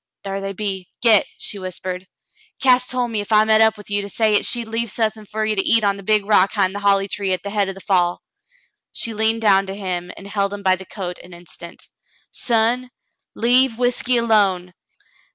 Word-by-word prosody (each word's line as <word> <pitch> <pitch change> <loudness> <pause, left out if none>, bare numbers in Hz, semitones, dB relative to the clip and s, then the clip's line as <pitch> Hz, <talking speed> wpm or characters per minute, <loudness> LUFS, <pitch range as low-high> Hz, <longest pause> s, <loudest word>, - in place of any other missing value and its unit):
"Thar 195 0 -4
they 195 0 -4
be. 195 -3 -4
Git," 220 -4 +5
she 205 - -5
whispered. 185 0 -6 0.5
"Cass 255 -1 +3
tol' 250 -1 -1
me 220 -3 -2
ef 205 - -9
I 215 0 +6
met 220 0 +3
up 220 -1 +4
with 210 - -13
ye, 205 0 +1
to 200 - -7
say 215 +1 +1
'at - - +2
she'd 235 -2 -1
leave 230 +1 -3
suthin' 215 0 -2
fer 215 +1 -2
ye 215 - +1
to 195 - +1
eat 225 +2 +3
on 200 -1 +2
the - - -9
big 210 +1 +1
rock 200 -2 +3
'hind 195 -3 +1
the 205 - -4
holly 200 -1 +2
tree 195 -1 -2
at 185 - -3
the 200 - -5
head 200 -2 0
o' - - -4
the 195 - -12
fall." 180 -3 0 0.7
She 230 - -3
leaned 220 +1 +1
down 195 -2 +4
to 195 - -5
him 180 -3 -4
and 195 - -11
held 200 0 -2
him 200 - -10
by 185 -1 +4
the 190 +1 -11
coat 180 -4 -6
an 180 -1 -13
instant, 170 0 -12 0.4
"Son, 240 +2 0 0.5
leave 245 0 +3
whiskey 245 0 +1
alone. 200 -6 +1
205 Hz, 220 wpm, -20 LUFS, 195-225 Hz, 0.7 s, I